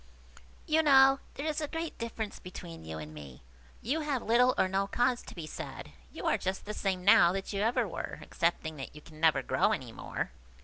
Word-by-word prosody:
You 315 -1 +3
know 270 -2 +6 0.2
there 280 - -4
is 310 0 -1
a 300 - -1
great 325 +1 -4
difference 225 -2 -4
between 85 - -9
you 80 0 -5
and 75 0 -8
me. 70 -5 -11 0.4
You 275 +8 0
have 290 -5 -1
little 245 +3 +4
or - - +3
no 195 +1 0
cause 245 +3 +1
to - - -11
be 170 -3 -6
sad. 150 - -7 0.2
You - - -7
are - - +2
just 190 +1 -3
the 210 - -4
same 190 -3 -2
now 205 -4 +7
that 195 +2 -4
you 200 - -1
ever 230 +3 +2
were, - - -5
excepting 165 -3 -1
that 135 +1 -7
you 150 - -10
can 155 +1 -15
never 155 -4 +4
grow - - +2
any - - -4
more. - - -4
200 Hz, 215 wpm, -31 LUFS, 155-260 Hz, 0.4 s, now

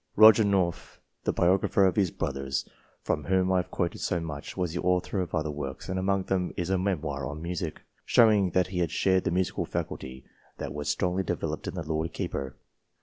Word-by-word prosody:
Roger 110 +1 +8
North, 95 -4 0 0.3
the - - +2
biographer 95 +2 +3
of 95 - +2
his 95 -3 +3
brothers, 70 -4 -3 0.4
from 75 - -1
whom 95 0 +2
I 95 - +3
have 90 - -1
quoted 85 -1 -2
so 90 - 0
much, 75 -1 -6
was 90 -3 -1
the 90 - -2
author 90 +2 +1
of 85 -2 -3
other 75 -1 -1
works, 70 -2 -6
and 95 0 -1
among 95 0 +1
them 95 -1 -1
is 90 +1 -2
a 95 - +3
memoir 75 -9 -2
on 75 +2 -6
Music, 85 0 -4 0.2
showing 105 -5 +5
that 90 +1 +1
he 90 -2 0
shared 95 +4 +1
the - - +2
musical 90 +1 0
faculty 65 0 -5 0.3
that - - -5
was 75 0 -3
strongly 90 +3 +1
developed 95 - -3
in - - -4
the 90 - -3
Lord 80 +1 -2
Keeper. 65 -2 -4
90 Hz, 200 wpm, -28 LUFS, 75-95 Hz, 0.4 s, Roger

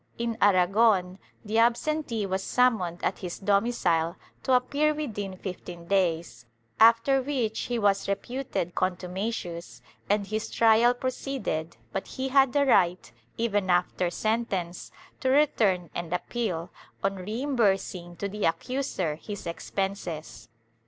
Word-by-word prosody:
In 235 -1 -2
Ara 185 -3 +5
gon 195 -2 +2 0.3
the 220 +2 +1
absentee 235 -1 +1
was 190 0 -1
summoned 205 -9 +1
at - - 0
his 180 -2 -5
domicile 195 -5 +1 0.3
to 265 - +1
appear 285 +4 +2
within 205 -10 -4
fifteen 180 -2 -7
days, 165 -10 0 0.3
after 230 +4 +6
which 250 -5 -1
he 240 - 0
was 200 -3 +2
reputed 200 -3 -3
contumacious 180 -1 -3 0.3
and 205 0 +2
his 215 +2 -3
trial 230 +2 +4
proceeded, 250 - -3 0.2
but 195 - -3
he 265 0 -4
had 270 -1 +5
the 285 +1 +3
right, 180 - +3 0.3
even 205 -4 0
after 180 0 +2
sentence, 195 -5 -2 0.3
to 260 - 0
return 215 - +2
and 170 -1 -5
appeal, 180 -3 -2 0.3
on 195 0 0
reimbursing 195 -5 -1
to 200 - -3
the 205 +1 -5
accuser 180 - -1
his 205 +3 -7
expenses.' 170 -4 -4
200 Hz, 125 wpm, -27 LUFS, 180-240 Hz, 0.3 s, after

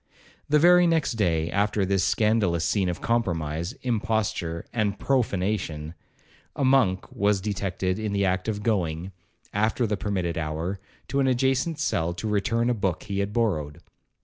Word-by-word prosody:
The 150 - +5
very 175 +3 +6
next 165 -3 +2
day 85 -8 0
after 100 0 +1
this 95 0 +1
scandalous 105 -7 +2
scene 95 -4 +1
of 85 - -4
compromise, 85 -6 -1
imposture, 105 -8 -1
and 105 -4 0
profanation, 95 - -1 0.6
a 140 - 0
monk 130 -9 +2
was 100 0 +1
detected 95 -1 -2
in 110 -1 -2
the 100 0 +1
act 95 +1 0
of 105 -2 -2
going, 90 -5 -1 0.4
after 110 +4 +1
the 105 -2 -1
permitted 90 -5 -2
hour, 80 +5 -3 0.3
to 140 - 0
an 135 - +3
adjacent 130 +5 +1
cell 85 - -1
to 110 - -4
return 115 +3 +1
a 125 - +3
book 95 -5 -2
he 100 -2 -3
had 100 0 -1
borrowed. 85 -10 -1
100 Hz, 155 wpm, -26 LUFS, 90-115 Hz, 0.6 s, very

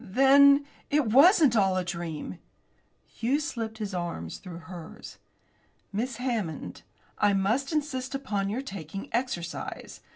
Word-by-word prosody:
"Then 280 +5 +6 0.2
it 295 -1 +2
wasn't 280 - +6
all 195 -3 +3
a 185 - -1
dream." 170 - -5 0.7
Hughes 275 +6 -1
slipped 225 -7 -4
his 210 -3 -4
arm 170 - -4
through 180 -3 -8
hers. 170 -1 -10 0.7
"Miss 235 +4 -2
Hammond, 220 - -3 0.4
I 205 -1 +4
must 220 - +1
insist 275 -4 -2
upon 205 -7 -2
your 245 +6 -3
taking 195 - -7
exercise. 230 -8 -4
220 Hz, 125 wpm, -28 LUFS, 185-270 Hz, 0.7 s, Then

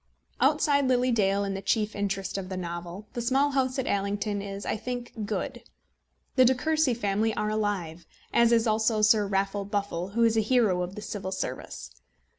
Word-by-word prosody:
Outside 280 -2 +3
Lily 255 0 +2
Dale 200 -3 +2
and 195 -1 -2
the 195 - -4
chief 215 0 0
interest 200 -1 -2
of 190 -2 -4
the 185 - -4
novel, 175 +2 -6
The 240 - -3
Small 270 +4 +2
House 260 -1 0
at 265 - -1
Allington 200 +1 -1
is, 200 0 -6
I - - -1
think, 245 +2 -5
good. 240 +5 -3 0.8
The 255 - +8
De 255 +1 +5
Courcy 310 -2 +1
family 215 0 0
are 210 0 -1
alive, 185 -6 -2 0.3
as 235 0 +5
is 230 -1 +4
also 220 0 +2
Sir 210 -1 +5
Raffle 195 +1 0
Buffle, 200 -2 -3
who 235 - +4
is 225 -1 +4
a 220 - +4
hero 215 -5 +2
of 180 +2 -4
the 210 - -7
Civil 190 -3 -5
Service. 130 - -5
210 Hz, 190 wpm, -27 LUFS, 195-240 Hz, 0.8 s, The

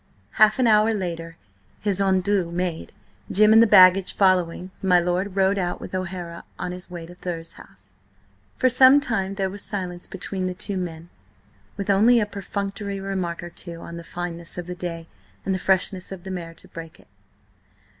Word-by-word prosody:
Half 215 -1 +4
an 255 - +2
hour 220 0 +4
later, 165 -4 -5 0.4
his 200 -2 0
adieux 190 -1 +1
made, 175 -1 -3 0.4
Jim 215 +2 +5
and 225 - +8
the 230 - +6
baggage 185 -1 +6
following, 185 -1 +2
my 180 -2 +4
lord 180 +3 -1
rode 195 +1 +2
out 175 -1 -2
with - - -9
O'Hara 175 -2 -5
on 180 - -4
his 180 +1 -6
way 175 -2 -7
to 175 - -12
Thurze 170 -2 -6
House. 95 0 -16 0.6
For 255 - +2
some 260 +3 +7
time 200 -8 -2
there 195 -1 0
was 200 +2 -6
silence 180 -4 -5
between 185 0 -4
the 180 - -4
two 200 +2 -1
men, 170 -2 -5 0.7
with 200 0 0
only 225 +5 +5
a 210 - +1
perfunctory 200 0 -5
remark 185 -3 -3
or 175 - -8
two 170 -1 -7
on 170 - -8
the 170 - -8
fineness 170 0 -6
of 175 - -4
the 180 - -5
day 170 -2 -6 0.4
and 195 - 0
the 185 - -1
freshness 185 0 0
of 190 -2 -8
the 190 - -6
mare 170 -2 -6
to - - -15
break 165 -1 -10
it. - - -21
185 Hz, 185 wpm, -23 LUFS, 175-200 Hz, 0.7 s, and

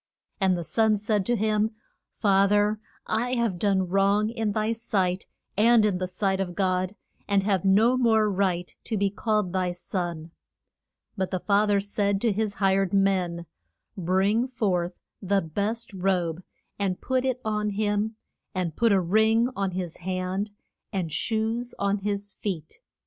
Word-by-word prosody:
And 190 -2 +2
the 170 - -3
son 220 +4 +2
said 205 -2 0
to 240 - +2
him, 215 0 +1 0.4
Fa 195 -2 +4
ther 205 +1 +2 0.3
I 245 +3 0
have 230 -7 0
done 190 -2 +2
wrong 200 +3 +2
in 225 -3 -1
thy 215 +1 0
sight, 195 -5 -1 0.3
and 225 +1 +5
in 195 -4 +1
the 185 - -1
sight 190 +1 -1
of 180 -2 -3
God, 185 0 0 0.3
and 200 -1 +2
have 195 -3 +1
no 215 +6 +4
more 220 -3 +3
right 185 -3 -1
to 220 - -2
be 200 0 +1
called 210 -3 0
thy 185 -1 0
son. 175 -2 -4 0.8
But 190 -3 -1
the 185 - -2
fa 205 +3 +2
ther 205 -1 +3
said 200 0 0
to 230 - +2
his 205 0 -1
hired 195 -1 +2
men, 185 -3 +1 0.5
Bring 195 +6 +1
forth 185 -8 -1 0.2
the 195 0 +1
best 205 +8 -3
robe 180 -3 0 0.4
and 190 -2 -1
put 260 0 0
it 260 -1 0
on 210 -1 0
him, 210 +1 -1 0.4
and 175 -4 -2
put 230 -2 +3
a 195 - +5
ring 220 +6 +3
on 195 -1 0
his 180 -2 -4
hand, 185 +3 -2 0.4
and 185 -6 -2
shoes 225 +6 -1
on 200 0 0
his 205 0 -3
feet. 180 - -5
200 Hz, 160 wpm, -26 LUFS, 185-215 Hz, 0.8 s, and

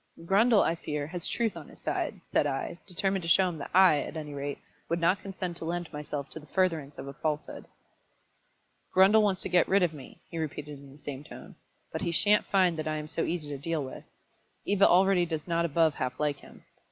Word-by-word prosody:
"Grundle, 210 +4 +5
I 165 - +1
fear, 150 -3 -4
has 170 +3 +1
truth 230 -3 -1
on - - -9
his - - -16
side," - - -3
said - - +1
I, 170 - -3
determined 190 +1 -1
to 165 - -6
show 185 +3 +5
him 165 -3 -7
that 140 - -6
I, 185 -5 +6
at 155 - -5
any 150 -2 -6
rate, 140 0 -4 0.3
would 170 - 0
not 175 +3 +2
consent 185 -3 -5
to 165 - -6
lend 175 0 -3
myself 150 -1 -5
to - - -6
the 150 - -16
furtherance 165 -7 0
of 135 - -7
a 140 - -6
falsehood. 150 +1 -3 1.3
"Grundle 195 +4 +7
wants 200 -3 +1
to - - -1
get 180 -1 +4
rid 195 0 +3
of 170 -2 +1
me," 140 -4 -11
he 165 - -4
repeated 150 -2 -5
in 140 -1 -14
the 140 - -15
same 145 -1 -7
tone. 150 - -11 0.4
"But - - -4
he 170 - -1
shan't 205 +5 +3
find 185 -4 +3
that 155 0 -3
I 155 - -1
am 150 0 -5
so 165 +1 -2
easy 165 -4 -3
to 140 -2 -5
deal 160 -1 -1
with. 130 - -8 0.6
Eva 200 0 +4
already 185 0 +5
does 160 -1 -4
not 170 0 +1
above 165 -1 +3
half 130 -2 -4
like 150 -2 0
him. - - -16
165 Hz, 225 wpm, -29 LUFS, 150-185 Hz, 1.3 s, Grundle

